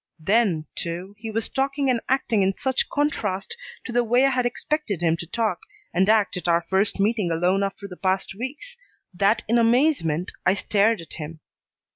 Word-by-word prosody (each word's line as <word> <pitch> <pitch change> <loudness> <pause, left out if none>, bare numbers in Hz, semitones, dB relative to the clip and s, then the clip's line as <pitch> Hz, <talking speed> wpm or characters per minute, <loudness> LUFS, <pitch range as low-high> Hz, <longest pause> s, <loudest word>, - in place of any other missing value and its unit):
Then, 190 -3 +2
too, 175 +4 -5
he 225 0 -6
was 220 0 -1
talking 275 +1 -1
and 235 -2 0
acting 240 -5 +2
in 190 0 +1
such 260 -1 0
contrast 225 - -1 0.3
to - - -5
the 240 0 +2
way 245 +3 +3
I 275 - +3
had 250 -1 +1
expected 245 - -2
him 165 -1 +3
to 170 - -7
talk 225 +4 -1 0.3
and 190 +3 +2
act 215 -3 +3
at 180 - -5
our 170 0 +3
first 195 +2 +1
meeting 210 -2 +1
alone 175 +4 +1
after 200 0 -3
the 180 -2 -10
past 190 0 -1
weeks, 270 - -7 0.4
that 200 +4 +2
in 235 +2 +3
amazement 230 - +2
I 185 - +3
stared 210 0 +2
at 165 - -9
him. 160 0 -7
210 Hz, 185 wpm, -24 LUFS, 185-245 Hz, 0.4 s, way